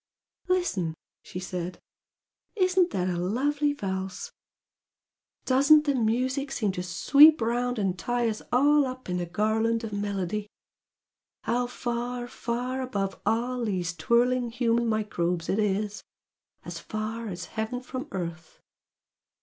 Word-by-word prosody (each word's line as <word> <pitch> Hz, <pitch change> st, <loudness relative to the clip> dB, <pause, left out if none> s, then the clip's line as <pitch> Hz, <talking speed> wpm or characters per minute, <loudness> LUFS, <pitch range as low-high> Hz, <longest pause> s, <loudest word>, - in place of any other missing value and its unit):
"Listen!" 205 Hz, -, 0 dB, 0.3 s
she 180 Hz, -, -7 dB
said 180 Hz, -1 st, -4 dB, 0.8 s
"Isn't 370 Hz, -2 st, +3 dB
that 185 Hz, -, -1 dB
a 175 Hz, -2 st, -1 dB
lovely 285 Hz, +10 st, +1 dB
valse? 190 Hz, -, -4 dB, 1.1 s
Doesn't 280 Hz, +4 st, +6 dB
the 285 Hz, -, +2 dB
music 255 Hz, +4 st, 0 dB
seem 215 Hz, -7 st, 0 dB
to 180 Hz, -, -4 dB
sweep 285 Hz, -, +6 dB
round 245 Hz, +2 st, 0 dB
and 190 Hz, -3 st, -1 dB
tie 240 Hz, -1 st, 0 dB
us 215 Hz, -1 st, -2 dB
all 285 Hz, +3 st, +4 dB
up 255 Hz, -4 st, -7 dB
in 180 Hz, -, 0 dB
a 175 Hz, -, -3 dB
garland 220 Hz, +4 st, +1 dB
of 220 Hz, -2 st, -5 dB
melody! 205 Hz, 0 st, -2 dB, 1.0 s
How 245 Hz, +2 st, 0 dB
far, 245 Hz, 0 st, -3 dB
far 245 Hz, +2 st, -3 dB
above 200 Hz, -7 st, -3 dB
all 240 Hz, +3 st, 0 dB
these 180 Hz, -5 st, -1 dB
twirling 240 Hz, +8 st, +2 dB
human 235 Hz, 0 st, +1 dB
microbes 180 Hz, -6 st, -1 dB
it 200 Hz, -, +1 dB
is! 210 Hz, 0 st, -1 dB, 0.6 s
as -, -, -6 dB
far 220 Hz, +2 st, -4 dB
as 180 Hz, -4 st, -5 dB
heaven 220 Hz, +3 st, -2 dB
from 255 Hz, +3 st, -6 dB
earth! 170 Hz, -3 st, -6 dB
230 Hz, 130 wpm, -27 LUFS, 195-255 Hz, 1.1 s, Doesn't